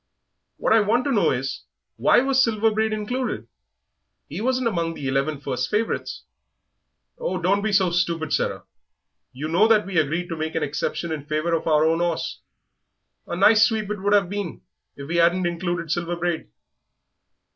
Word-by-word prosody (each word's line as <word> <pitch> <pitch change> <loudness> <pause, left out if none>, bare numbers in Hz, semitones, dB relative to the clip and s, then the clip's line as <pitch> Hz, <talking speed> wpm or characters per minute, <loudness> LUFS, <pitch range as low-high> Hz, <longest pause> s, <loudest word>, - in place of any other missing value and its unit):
"What - - +2
I 225 - +6
want 225 +4 +1
to 285 - 0
know 215 -6 +3
is, 135 +1 -3 0.3
why - - +4
Silver 225 -4 +3
Braid 220 +1 +1
was 215 - -1
included? 250 +4 -3 0.8
he - - -6
wasn't 255 +1 +1
among 170 -6 -1
the 140 - -5
eleven 135 +2 0
first 130 -3 -3
favourites." 220 +2 -2 1.0
"Oh, - - -2
don't 195 +3 +1
be 215 +1 -1
so 190 -3 +3
stupid, 170 -3 -1
Sarah; - - -1 0.7
you 140 +5 -5
know 175 +7 +4
that 220 -2 +4
we 185 -4 0
agreed 160 +4 -1
to 165 - -3
make 160 0 -4
an 160 - 0
exception 150 +3 -3
in 150 -2 -5
favour 155 +2 -1
of 165 - -1
our 155 -1 +4
own 165 +1 +2
'orse 170 -2 -2 0.9
a - - -3
nice 210 +4 +5
sweep 215 -2 0
it 210 -2 -4
would 205 +1 +3
'ave 200 -3 +3
been 200 -3 -5 0.3
if 140 0 -9
we 170 +2 0
'adn't 175 +2 +3
included 175 -1 -2
Silver 175 0 -1
Braid." 175 -1 -2
175 Hz, 180 wpm, -23 LUFS, 160-210 Hz, 1.0 s, I